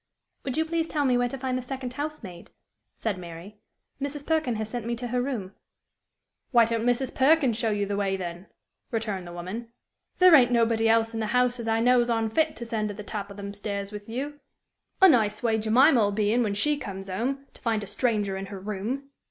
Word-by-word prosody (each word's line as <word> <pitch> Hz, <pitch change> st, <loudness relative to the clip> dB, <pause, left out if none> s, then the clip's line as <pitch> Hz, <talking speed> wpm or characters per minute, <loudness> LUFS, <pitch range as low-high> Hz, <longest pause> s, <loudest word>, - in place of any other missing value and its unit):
"Would 260 Hz, 0 st, -3 dB
you 320 Hz, -, +2 dB
please 325 Hz, 0 st, -1 dB
tell 295 Hz, -3 st, 0 dB
me 255 Hz, -2 st, +3 dB
where 245 Hz, 0 st, +2 dB
to 270 Hz, -, -5 dB
find 260 Hz, -1 st, -2 dB
the 255 Hz, -, -1 dB
second 255 Hz, 0 st, -5 dB
house 300 Hz, 0 st, -4 dB
maid," 175 Hz, -3 st, -10 dB, 0.5 s
said 205 Hz, -5 st, -2 dB
Mary. 175 Hz, +4 st, -10 dB, 0.4 s
"Mrs. 285 Hz, +1 st, -4 dB
Perkin 315 Hz, -7 st, +1 dB
has 215 Hz, 0 st, -3 dB
sent 235 Hz, 0 st, -5 dB
me 235 Hz, -, -1 dB
to 240 Hz, +1 st, -5 dB
her 250 Hz, +1 st, 0 dB
room." 235 Hz, -8 st, -3 dB, 1.0 s
"Why 235 Hz, -3 st, +6 dB
don't 230 Hz, +1 st, -1 dB
Mrs. 245 Hz, +2 st, +1 dB
Perkin 275 Hz, -2 st, +4 dB
show 225 Hz, +1 st, 0 dB
you 205 Hz, -1 st, 0 dB
the 200 Hz, 0 st, -2 dB
way, 195 Hz, -1 st, 0 dB
then?" 175 Hz, 0 st, -6 dB, 0.4 s
returned 215 Hz, -6 st, -3 dB
the -, -, -8 dB
woman. 185 Hz, +7 st, -6 dB, 0.5 s
"There 365 Hz, -1 st, +7 dB
ain't 250 Hz, -5 st, +7 dB
nobody 230 Hz, -1 st, +3 dB
else 225 Hz, 0 st, +3 dB
in 225 Hz, -, -3 dB
the 220 Hz, -, -1 dB
house 250 Hz, +2 st, +2 dB
as 230 Hz, -, -5 dB
I 225 Hz, 0 st, +2 dB
knows 245 Hz, 0 st, +4 dB
on 225 Hz, -1 st, 0 dB
fit 315 Hz, +4 st, +1 dB
to 235 Hz, -, -7 dB
send 220 Hz, -2 st, -1 dB
to 205 Hz, -, -5 dB
the 210 Hz, -, -7 dB
top 205 Hz, -1 st, -5 dB
o' -, -, -9 dB
them 200 Hz, 0 st, -6 dB
stairs 200 Hz, -1 st, -4 dB
with 210 Hz, 0 st, -8 dB
you. 285 Hz, +5 st, -4 dB, 0.6 s
A -, -, +11 dB
nice 220 Hz, -, +3 dB
way 225 Hz, -2 st, +2 dB
Jemim' 250 Hz, +8 st, +5 dB
'ill 205 Hz, -3 st, +3 dB
be 210 Hz, +1 st, +1 dB
in 245 Hz, -, +3 dB
when 205 Hz, -4 st, 0 dB
she 295 Hz, +8 st, +2 dB
comes 195 Hz, -6 st, -6 dB
'ome, 255 Hz, +9 st, -2 dB
to -, -, -19 dB
find 225 Hz, -3 st, 0 dB
a -, -, -5 dB
stranger 205 Hz, -1 st, 0 dB
in 195 Hz, 0 st, -5 dB
her 195 Hz, -1 st, -7 dB
room!" 215 Hz, +8 st, -4 dB
230 Hz, 230 wpm, -26 LUFS, 205-255 Hz, 1.0 s, A